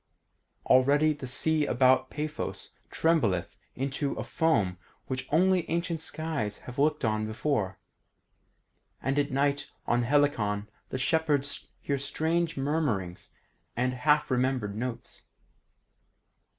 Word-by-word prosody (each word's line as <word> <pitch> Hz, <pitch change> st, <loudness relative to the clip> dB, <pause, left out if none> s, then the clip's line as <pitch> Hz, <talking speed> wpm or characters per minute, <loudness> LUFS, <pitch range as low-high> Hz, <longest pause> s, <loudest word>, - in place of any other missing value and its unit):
Already 145 Hz, +4 st, +4 dB
the 140 Hz, -3 st, -8 dB
sea 150 Hz, +3 st, +2 dB
about 130 Hz, +1 st, +3 dB
Paphos 150 Hz, 0 st, -4 dB, 0.2 s
trembleth 120 Hz, -, +1 dB, 0.2 s
into 135 Hz, +2 st, -2 dB
a -, -, -4 dB
foam 105 Hz, -, +1 dB, 0.3 s
which 130 Hz, -1 st, -4 dB
only 180 Hz, +2 st, +3 dB
ancient 170 Hz, -1 st, -1 dB
skies 155 Hz, -11 st, -3 dB
have 125 Hz, +1 st, -7 dB
looked 150 Hz, -3 st, +2 dB
on 110 Hz, 0 st, 0 dB
before, 110 Hz, -4 st, -1 dB, 1.2 s
and 135 Hz, +2 st, 0 dB
at 145 Hz, 0 st, +1 dB
night 140 Hz, +1 st, 0 dB, 0.2 s
on 120 Hz, 0 st, +2 dB
Helicon 115 Hz, -6 st, +1 dB, 0.2 s
the -, -, -3 dB
shepherds 145 Hz, 0 st, 0 dB
hear 140 Hz, -1 st, -1 dB
strange 160 Hz, +4 st, -1 dB
murmurings 135 Hz, -, -1 dB, 0.5 s
and 125 Hz, +1 st, +1 dB
half 150 Hz, +3 st, +2 dB
remembered 125 Hz, -5 st, 0 dB
notes. 120 Hz, +1 st, -6 dB
140 Hz, 110 wpm, -28 LUFS, 120-155 Hz, 1.2 s, Already